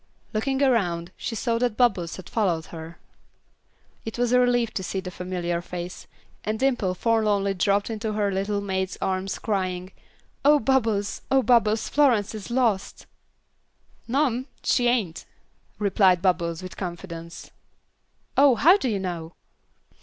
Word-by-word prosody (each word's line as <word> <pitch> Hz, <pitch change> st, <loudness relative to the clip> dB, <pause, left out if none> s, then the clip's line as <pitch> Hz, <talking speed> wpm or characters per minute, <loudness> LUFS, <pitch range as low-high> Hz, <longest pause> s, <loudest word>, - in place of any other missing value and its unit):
Looking 265 Hz, +5 st, 0 dB
around, 180 Hz, -10 st, +1 dB
she 230 Hz, -, -5 dB
saw 230 Hz, +1 st, 0 dB
that 245 Hz, -3 st, 0 dB
Bubbles 195 Hz, -9 st, +2 dB
had 185 Hz, -, -10 dB
followed 175 Hz, -8 st, 0 dB
her. 165 Hz, 0 st, -8 dB, 1.1 s
It 225 Hz, -, -6 dB
was 245 Hz, 0 st, +1 dB
a 250 Hz, -, +5 dB
relief 245 Hz, -2 st, +2 dB
to 190 Hz, -, -3 dB
see 190 Hz, +1 st, -3 dB
the 185 Hz, -1 st, -6 dB
familiar 175 Hz, -2 st, -3 dB
face, 175 Hz, +1 st, -7 dB, 0.4 s
and 215 Hz, +1 st, -2 dB
Dimple 240 Hz, -8 st, +1 dB
forlornly 210 Hz, -2 st, +1 dB
dropped 200 Hz, +3 st, +1 dB
into 220 Hz, 0 st, -3 dB
her 205 Hz, -1 st, 0 dB
little 200 Hz, +2 st, -1 dB
maid's 190 Hz, -1 st, -2 dB
arms 190 Hz, 0 st, -2 dB
crying: 185 Hz, -3 st, -2 dB, 0.5 s
"Oh, 295 Hz, +2 st, +6 dB
Bubbles! 225 Hz, -6 st, 0 dB
Oh, 270 Hz, -1 st, +3 dB
Bubbles, 225 Hz, -3 st, +3 dB
Florence 240 Hz, -9 st, +3 dB
is 215 Hz, 0 st, -7 dB
lost." 235 Hz, -6 st, 0 dB, 1.0 s
"No 275 Hz, +6 st, +2 dB
'm, 255 Hz, 0 st, -2 dB, 0.2 s
she 245 Hz, -2 st, +2 dB
ain't," 215 Hz, -9 st, 0 dB, 0.5 s
replied 195 Hz, -3 st, +3 dB
Bubbles, 170 Hz, -2 st, 0 dB
with 185 Hz, -, -8 dB
confidence. 170 Hz, -2 st, -7 dB, 0.8 s
"Oh, 275 Hz, -1 st, +6 dB
how 330 Hz, -, +6 dB
do 260 Hz, -, -1 dB
you 210 Hz, -, 0 dB
know?" 175 Hz, -3 st, -5 dB
205 Hz, 145 wpm, -25 LUFS, 185-240 Hz, 1.1 s, Oh